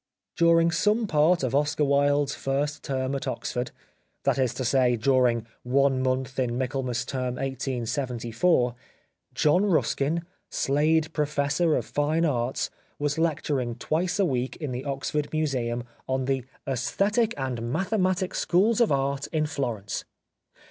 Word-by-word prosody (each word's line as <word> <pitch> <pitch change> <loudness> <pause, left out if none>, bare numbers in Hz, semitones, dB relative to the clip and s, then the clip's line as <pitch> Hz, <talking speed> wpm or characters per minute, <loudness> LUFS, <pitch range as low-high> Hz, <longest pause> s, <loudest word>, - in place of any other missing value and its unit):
During 170 0 +4
some 215 +6 +2
part 160 -1 +3
of 130 - -1
Oscar 145 +1 +2
Wilde's 145 0 +2
first 140 +2 -2
term 130 0 -2
at 135 - -3
Oxford 125 0 -3 0.3
— - - -45
that - - +1
is 130 -3 +2
to 130 - -3
say, 125 0 +3
during 120 -1 +2 0.2
one 135 +1 +2
month 130 0 -1
in 120 -2 0
Michaelmas 130 -2 -2
Term 125 -2 -2
1874 125 0 0 0.3
— - - -44
John 165 +6 +3
Ruskin, 165 -2 +1 0.3
Slade 155 +3 +1
Professor 150 +2 +1
of - - -1
Fine 155 +3 +1
Arts, 125 -4 -1 0.3
was 145 +2 -1
lecturing 145 -7 0
twice 175 +7 -1
a 200 - +3
week 130 -5 -1
in 150 -4 -5
the 125 +2 -4
Oxford 145 +2 -2
Museum 125 -6 -1 0.3
on 130 0 0
the 135 -2 -1
" - - -31
^Esthetic 200 - +1
and 120 -3 -3
Mathematic 185 - 0
schools 210 +6 +2
of 235 - +4
Art 140 +1 0
in 155 -1 0
Florence." 120 -9 -3
140 Hz, 145 wpm, -26 LUFS, 130-155 Hz, 0.3 s, During